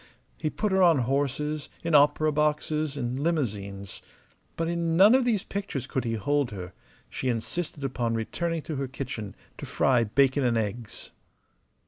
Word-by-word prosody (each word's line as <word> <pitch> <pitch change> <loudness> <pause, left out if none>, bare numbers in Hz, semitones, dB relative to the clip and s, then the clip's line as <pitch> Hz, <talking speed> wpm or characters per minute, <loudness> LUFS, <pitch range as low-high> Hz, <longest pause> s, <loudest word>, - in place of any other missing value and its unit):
He 155 - -2
put 210 +6 -2
her 190 0 +3
on 170 -4 +6
horses, 145 +3 -1
in 165 -1 -1
opera 150 +1 +5
boxes, 150 0 0
in 125 0 -2
limousines. 100 - -2 0.6
But 165 - 0
in 170 -1 0
none 200 +5 +8
of 260 -1 +4
these 220 -6 +1
pictures 200 - -4
could 130 -2 -2
he 115 -1 -1
hold 145 +4 0
her; 90 -4 -7 0.3
she 130 - -3
insisted 130 +7 -3
upon 120 -3 -1
returning 165 +8 -2
to 155 - -4
her 135 0 -2
kitchen 125 -6 -6 0.2
to - - -6
fry 125 -3 +3
bacon 135 +5 +2
and 120 -2 +2
eggs. 110 +1 -4
140 Hz, 160 wpm, -27 LUFS, 120-160 Hz, 0.6 s, none